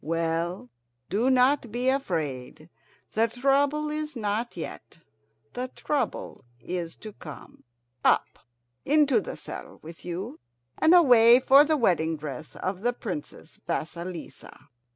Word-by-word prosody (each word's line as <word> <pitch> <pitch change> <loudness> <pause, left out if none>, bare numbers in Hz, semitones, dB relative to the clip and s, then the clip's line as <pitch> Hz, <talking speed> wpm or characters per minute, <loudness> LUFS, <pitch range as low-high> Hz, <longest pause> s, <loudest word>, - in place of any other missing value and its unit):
Well, 165 -2 -2 0.4
do 225 +7 +2
not 255 -1 +3
be 245 +3 -1
afraid. 160 - -2 0.4
The 225 +1 +2
trouble 280 +5 +1
is 305 -1 -4
not 220 0 -2
yet; 165 - -8 0.6
the 250 +1 -3
trouble 295 - -3 0.2
is 170 +5 -5
to 215 -1 -10
come. 155 -6 -12 0.4
Up! - - +2 0.4
into 285 -6 +3
the 165 - -7
saddle 150 - -9
with 165 +1 -11
you, 175 -2 -5 0.4
and 325 +3 +6
away 245 -7 +7
for 275 +2 +7
the 310 +1 +1
wedding 165 - +1
dress 145 -1 -7
of 185 0 -4
the 245 +2 +1
Princess 180 -8 -7
Vasilissa!" 170 -2 -6
210 Hz, 125 wpm, -26 LUFS, 165-265 Hz, 0.6 s, away